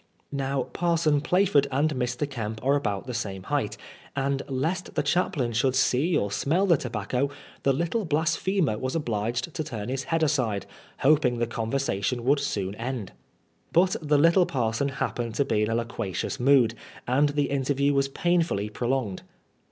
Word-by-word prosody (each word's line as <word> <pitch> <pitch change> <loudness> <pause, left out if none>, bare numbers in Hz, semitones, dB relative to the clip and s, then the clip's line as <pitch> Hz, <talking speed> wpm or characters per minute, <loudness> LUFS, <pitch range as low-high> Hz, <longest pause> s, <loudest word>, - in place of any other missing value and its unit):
Now 135 -1 -1
Parson 160 -2 +1
Plaford 175 -3 +3
and 150 +4 +1
Mr. 125 +2 -1
Kemp 110 -5 -5
are 140 - +4
about 105 -9 -1
the 125 - -5
same 100 -5 -4
height, - - -1 0.4
and 140 0 0
lest 160 +8 -2
the - - +1
chaplain 140 -9 0
should 130 +3 +2
see 145 +6 +2
or 100 -6 -1
smell 165 - +1
the 175 -4 +5
tobacco, 125 +1 -2 0.3
the 135 - +3
little 170 - 0
blasphemer 160 - +1
was 130 +3 -3
obliged 120 +1 -2
to 155 - -2
turn 115 -5 -5
his 135 +1 -2
head 165 -1 0
aside, 125 -10 0 0.4
hoping 135 -4 +4
the 120 - +1
conversatioir 115 -1 -1
would 140 +3 +3
soon 100 -8 -2
end. 120 -4 -4 0.6
But 180 +2 +4
the 150 -1 +2
little 170 +4 +5
parson 120 +1 0
happened 120 -4 -3
to 140 - +2
be 110 -6 +1
in 105 - +1
a 115 - 0
loquacious 115 0 -3
mood, 125 -3 +4 0.3
and 140 +4 +3
the 145 -1 0
interview 140 +1 +1
was 140 0 +2
painfully 165 - 0
pro 120 +3 -3
longed. 125 -8 -1
135 Hz, 165 wpm, -26 LUFS, 115-150 Hz, 0.6 s, the